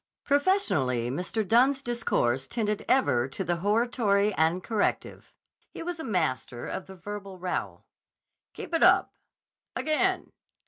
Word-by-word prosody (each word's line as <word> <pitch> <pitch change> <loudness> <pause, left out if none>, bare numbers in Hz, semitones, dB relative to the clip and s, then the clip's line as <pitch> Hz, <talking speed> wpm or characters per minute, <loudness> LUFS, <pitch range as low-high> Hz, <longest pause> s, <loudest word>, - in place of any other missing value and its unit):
Professionally 185 - +1
Mr. 180 - -2
Dunne's 260 +5 +3
discourse 135 - 0
tended 210 -3 -2
ever 125 - +3
to 165 +8 -5
the 175 -1 -1
hortatory 210 0 +1
and 165 +2 +1
corrective. 220 -3 -2 0.3
He - - -8
was 345 0 -4
a - - -4
master 155 - -2
of 190 - -5
the 190 - -10
verbal 200 0 -8
rowel. 180 0 -4 0.7
"Keep - - -8
it 330 - +1
up!" - - +5 0.6
"Again!" 310 0 0
205 Hz, 130 wpm, -27 LUFS, 170-240 Hz, 0.7 s, up